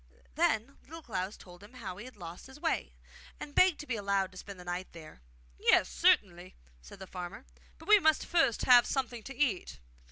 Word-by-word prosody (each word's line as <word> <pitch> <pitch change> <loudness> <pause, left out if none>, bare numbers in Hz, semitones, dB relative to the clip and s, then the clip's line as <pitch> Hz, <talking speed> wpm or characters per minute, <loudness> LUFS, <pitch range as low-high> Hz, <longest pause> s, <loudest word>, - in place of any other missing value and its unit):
Then 225 - 0
Little 325 +2 -11
Klaus 195 -4 -4
told 180 0 -15
him 205 +4 -15
how 205 -8 -7
he 210 - -9
had 255 - -12
lost 175 +2 -9
his 265 +2 -14
way, - - -2 0.4
and 290 - -8
begged 365 -2 +4
to - - -9
be 255 - -2
allowed 200 -2 0
to 185 - -14
spend 200 -2 -10
the - - -9
night 175 +1 -5
there. 160 - -12 0.4
'Yes, - - +4
certainly,' 175 - +2 0.3
said 60 - -13
the 190 - -9
farmer; 185 +5 -8 0.3
'but - - -15
we 425 0 +8
must 315 -4 +2
first 275 -10 +2
have 245 -2 +7
something 250 -4 -2
to 270 +4 -9
eat! 205 - -1
205 Hz, 200 wpm, -31 LUFS, 180-265 Hz, 0.4 s, we